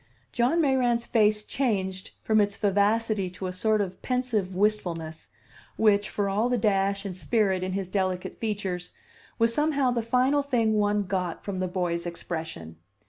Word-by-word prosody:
John 245 +8 +2
Mayrant's 250 -5 +2
face 210 -2 +2
changed 190 -8 -2
from 215 -1 +3
its 205 0 -1
vivacity 205 0 +1
to 185 +1 -7
a 185 - -3
sort 215 +3 +1
of 185 -2 -5
pensive 240 -7 -1
wistfulness, 175 -6 -1 0.5
which, 205 -1 +3
for 205 -1 -1
all 210 +5 +1
the 250 - +1
dash 200 -2 +1
and 190 -2 -4
spirit 190 +2 +1
in 185 0 -2
his 195 -1 -2
delicate 185 -1 -2
features, 195 -5 -4 0.4
was 230 0 +2
somehow 285 -2 +2
the 240 -1 0
final 255 +5 +2
thing 240 -6 +1
one 210 -1 +2
got 185 -3 -3
from 195 -2 -3
the 185 - 0
boy's 175 -2 -2
expression. 160 - -6
205 Hz, 160 wpm, -27 LUFS, 185-230 Hz, 0.5 s, from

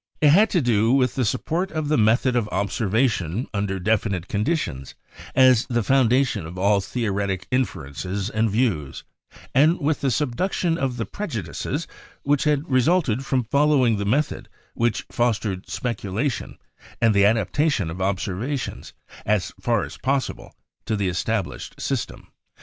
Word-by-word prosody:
It 150 - +5
had 205 +7 +5
to 175 - +2
do 115 -1 +3
with 130 -2 +3
the 130 - 0
support 165 - -1
of 155 -2 -2
the 155 - +2
method 115 +3 +3
of 115 -3 0
observation 105 - 0
under 100 -2 -1
defi 110 +3 +1
nite 95 -2 -3
conditions 100 - -2 0.4
as 130 -3 +5
the 120 -3 0
foundation 125 -6 +2
of 85 +3 -9
all 100 +2 +3
theoretic 100 -4 -2
infer 120 - -1
ences 95 +8 -4
and 110 +1 +2
views, 100 - -1 0.5
and 155 +7 +4
with 145 +1 0
the 140 - 0
subduction 160 - 0
of 135 -6 -2
the 115 - -2
prejudices 110 - -4 0.4
which 145 +1 +1
had 150 +1 +1
resulted 135 -1 +2
from 130 -2 +1
following 140 -2 +3
the 100 - -2
method 140 +9 -1 0.2
which 115 -1 0
fos 120 -2 +2
tered 95 -3 -5
speculation 120 +2 -3 0.4
and 115 -1 +4
the 100 0 +4
adaptation 110 - +1
of 90 +3 -6
observations, 100 +8 -3 0.3
as 105 -3 0
far 115 -3 +1
as - - -8
possible, 135 0 -2 0.4
to 110 - 0
the 100 -3 0
established 95 +2 -3
system. - - -4
115 Hz, 150 wpm, -23 LUFS, 100-135 Hz, 0.5 s, It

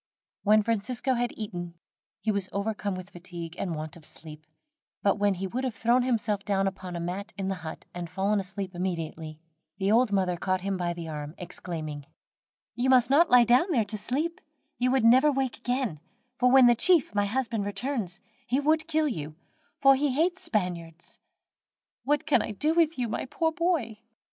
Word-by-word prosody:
When 215 +1 +4
Francisco 230 +4 -1
had 245 -1 0
eaten, 175 -5 -6 0.5
he 220 - +1
was 200 -2 -1
overcome 200 -1 -2
with 185 +1 -9
fatigue 175 -2 -8
and 175 -4 -2
want 155 0 -6
of 170 - -14
sleep, 155 0 -11 0.6
but 200 0 +2
when 205 -1 +2
he 190 +2 -4
would 245 +8 -3
have 255 -5 -2
thrown 235 +4 +3
himself 220 -5 0
down 195 -1 +1
upon 185 -2 -4
a - - -3
mat 185 +5 -5
in 195 -1 -2
the 190 -4 -4
hut, 160 0 -8
and 175 -1 -6
fallen 195 +3 0
asleep 195 0 -5
immediately, 165 -3 -4 0.4
the 195 +1 +1
old 235 0 +4
mother 185 -3 +1
caught 185 +1 -1
him 195 +1 -2
by 175 -1 -1
the 170 -1 -7
arm, 150 0 -6
exclaiming: 155 -5 -6 0.7
"You 250 +2 0
must 255 -1 +5
not 325 +5 +5
lie 250 -1 +7
down 245 - +4
there 240 -10 +2
to 215 - -3
sleep, 305 - -2 0.4
you 250 +1 +2
would 260 -3 +2
never 260 +6 +6
wake 270 -3 -1
again; 245 - -2 0.4
for 250 - +4
when 260 0 +7
the 240 - +7
chief, 325 - +4
my 205 -1 +2
husband, 230 -2 -1
returns, 205 -3 -3 0.3
he 260 - +1
would 310 +2 +1
kill 315 -1 +1
you, 155 - -4 0.5
for 275 0 +8
he 280 0 0
hates 350 +5 +1
the - - -13
Spaniards. 170 -5 -3 0.9
What 295 +1 +1
can - - +3
I - - -4
do 305 +10 +1
with 330 -2 +2
you, 245 -2 -1
my 220 - -3
poor 320 +5 0
boy?" 320 -11 -1
205 Hz, 190 wpm, -27 LUFS, 180-255 Hz, 0.9 s, for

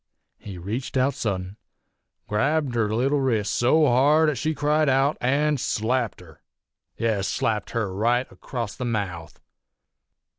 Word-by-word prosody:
He 100 -3 -9
reached 110 +10 -4
out 130 +2 +2
suddent, 95 -4 -3 0.7
grabbed 140 +5 0
her 115 -3 0
leetle 135 +6 +1
wrist 115 -6 0
so 150 +6 +3
hard 150 +5 +4
'at 140 - -5
she 155 0 -1
cried 150 +1 +2
out, 135 +3 +2
an' 145 +4 +2
slapped 115 -2 -1
her 80 -3 -16 0.6
yes, 110 -4 0
slapped 105 -3 -1
her 110 -5 -2
right 120 +5 +1
across 120 -5 -5
the - - -5
mouth. 95 -9 -4
120 Hz, 140 wpm, -24 LUFS, 105-140 Hz, 0.7 s, hard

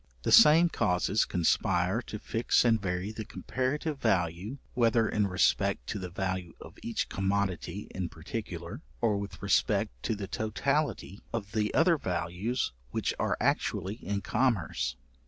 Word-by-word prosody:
The - - 0
same 160 +3 +8
causes 100 - +1
conspire 90 +3 +1
to 105 - -5
fix 115 +3 +1
and 115 -3 +3
vary 90 +1 -2
the 110 0 -6
comparative 135 +7 -3
value, 95 - 0 0.2
whether 115 -2 +3
in 105 -1 +1
respect 100 +1 +1
to 105 - -2
the 90 -1 -5
value 95 -1 -3
of - - -12
each 115 - -2
commodity 95 -1 -2
in 90 -2 -3
particular, 85 - -6 0.2
or 110 -3 +2
with 100 0 -7
respect - - +2
to 110 - -1
the 100 -1 -5
totality 110 0 -1
of 105 -3 -4
the 105 0 0
other 165 +1 +4
values 90 - -2 0.2
which - - -1
are - - 0
actually 100 +4 0
in 100 0 -2
commerce. 85 - 0
100 Hz, 145 wpm, -30 LUFS, 90-115 Hz, 0.2 s, same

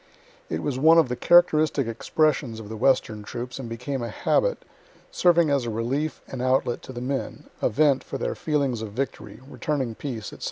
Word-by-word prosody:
It 80 - -3
was 130 -3 -2
one 160 +4 +6
of 160 -6 +4
the 125 - -1
characteristic 155 -3 +4
expressions 120 0 0
of 105 -2 -9
the 110 - -5
western 110 -3 +1
troops, 120 +5 -6
and 125 -3 -6
became 125 +3 -4
a 120 - -3
habit, - - 0 0.5
serving 170 -3 +3
as 140 -3 +1
a - - -2
relief 125 +8 -2
and 130 - -6
outlet 130 -1 +1
to - - -8
the 120 -1 -6
men 135 +2 -3 0.2
a - - +2
vent 140 +2 +3
for 135 - -5
their - - -2
feelings 140 -7 -1
of 105 -2 -6
victory, 135 +1 -5
returning 140 -4 -2
peace, 115 -3 -6
&c. - - -12
130 Hz, 195 wpm, -25 LUFS, 115-150 Hz, 0.5 s, one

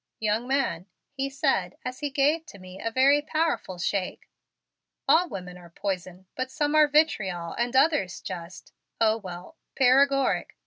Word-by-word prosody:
"Young 220 +2 0
man," 260 -10 -1 0.2
he 275 0 -3
said 270 - 0
as 255 0 -5
he 290 - -2
gave 295 +3 +1
to - - -12
me 185 0 -11
a 230 - 0
very 270 +5 +4
powerful 310 - -1
shake, 185 +1 -2 0.8
"all 350 +2 +4
women 180 -1 -7
are 175 -1 -14
poison 185 0 -5
but 255 0 -3
some 295 +1 -1
are 305 -1 +6
vitriol 195 - +1
and 240 +1 -2
others 270 - +2
just 175 +1 -8 0.3
Oh, 220 -1 +3
well, 185 - -9 0.2
paregoric. 275 +1 +3
250 Hz, 150 wpm, -26 LUFS, 185-285 Hz, 0.8 s, are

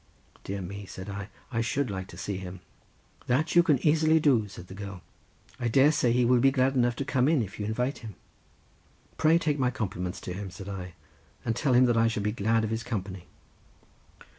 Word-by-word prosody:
"Dear 100 0 -4
me," 100 +2 -7
said 95 +2 -7
I, 100 +1 -6 0.2
"I 115 -2 0
should 130 +1 -1
like 95 -1 -5
to - - -12
see 100 -2 -3
him." 95 -1 -8 0.7
"That 145 +7 +1
you 175 - +9
can 160 -5 +3
easily 160 +1 +4
do," 130 -9 +3
said 90 -3 -10
the 95 - -11
girl; 100 -2 -8 0.6
"I 120 - 0
dare 135 +5 +5
say 130 -6 +2
he 125 +1 +3
will 125 +1 +4
be 135 +3 +5
glad 135 0 +2
enough 120 -2 +2
to 140 - -3
come 130 -3 +2
in 150 -6 +3
if 100 0 -9
you 105 - -2
invite 125 +5 -1
him." 110 -5 -9 1.0
"Pray 160 +1 +4
take 150 -3 0
my 125 -2 +2
compliments 95 -7 -4
to 90 - -5
him," 100 +1 -5
said 95 +2 -10
I, 90 -3 -6 0.5
"and 115 - 0
tell 130 +2 +1
him 125 +1 +6
that 120 -2 +2
I 115 0 +4
shall 105 -3 -1
be 105 - +1
glad 115 +1 +1
of 110 - -2
his 115 0 -1
company." 95 -6 -5
115 Hz, 215 wpm, -28 LUFS, 100-130 Hz, 1.0 s, you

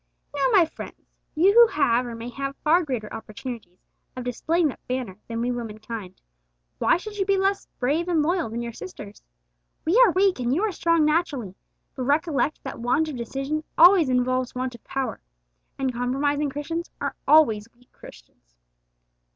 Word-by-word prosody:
Now, 280 -2 +1
my 355 - +6
friends, 320 - -11 0.2
you 370 +6 +5
who 470 +1 +8
have 245 - +1
or 235 - -6
may 230 +1 -7
have 275 +2 -5
far 330 +4 +4
greater 245 -8 -4
opportunities 220 -4 -8 0.3
of 255 - -4
displaying 315 +7 0
that - - -8
banner 250 -7 -4
than 230 0 -3
we 245 +1 0
womenkind, 220 -4 -6 0.6
why - - +3
should 415 +3 -8
you - - +3
be 390 0 +2
less 390 +1 0
brave 295 +7 0
and 330 -4 +2
loyal 340 -4 0
than 235 +2 -4
your 235 -1 -5
sisters? 200 +1 -10 0.6
We 380 +10 +4
are 475 - +6
weak 380 -3 +2
and 245 +1 0
you 370 - 0
are 440 - +1
strong 335 -3 +2
naturally, 300 - 0 0.4
but 255 - -4
recollect 300 +1 0
that - - -7
want 270 +7 +1
of 295 - -5
decision 270 +6 -3
always 345 -3 +7
involves 255 0 0
want 255 0 -3
of 235 - -14
power, 270 -1 -4 0.6
and 265 -2 -1
compromising 280 +4 0
Christians 325 +5 -4
are - - -2
always 230 -9 +4
weak 245 +1 -27
Christians. - - -17
270 Hz, 175 wpm, -24 LUFS, 240-330 Hz, 0.6 s, who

